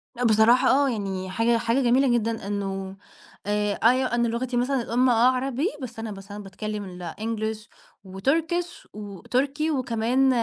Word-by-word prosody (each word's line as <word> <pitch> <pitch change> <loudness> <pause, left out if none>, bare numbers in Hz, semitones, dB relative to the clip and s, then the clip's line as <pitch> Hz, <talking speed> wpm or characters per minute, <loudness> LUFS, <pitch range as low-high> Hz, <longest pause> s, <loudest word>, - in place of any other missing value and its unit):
لأ 245 - -3
بصراحة 230 +3 +5
آه، 280 +1 +4
يعني 195 -5 -3
حاجة 230 +4 +2
حاجة 230 +3 +1
جميلة 255 +2 +3
جدًا 225 -3 -1
إنه، 195 -1 -4 0.5
آآ 210 0 0
أيوه 250 +1 +3
أنا 235 0 +2
لغتي 245 +2 -2
مثلًا 255 +2 +1
الأُم 250 +2 +2
آه 235 +1 +4
عربي 270 +6 -1
بس 235 -3 -7
أنا 225 -1 -5
مثلًا 200 +1 -9
باتكلّم 200 -2 -6
الEnglish، 220 0 -4 0.4
وTurkish 325 - -1
و 205 -3 -8
تركي 285 +5 0
وكمان 255 0 +1
230 Hz, 150 wpm, -25 LUFS, 210-255 Hz, 0.5 s, بصراحة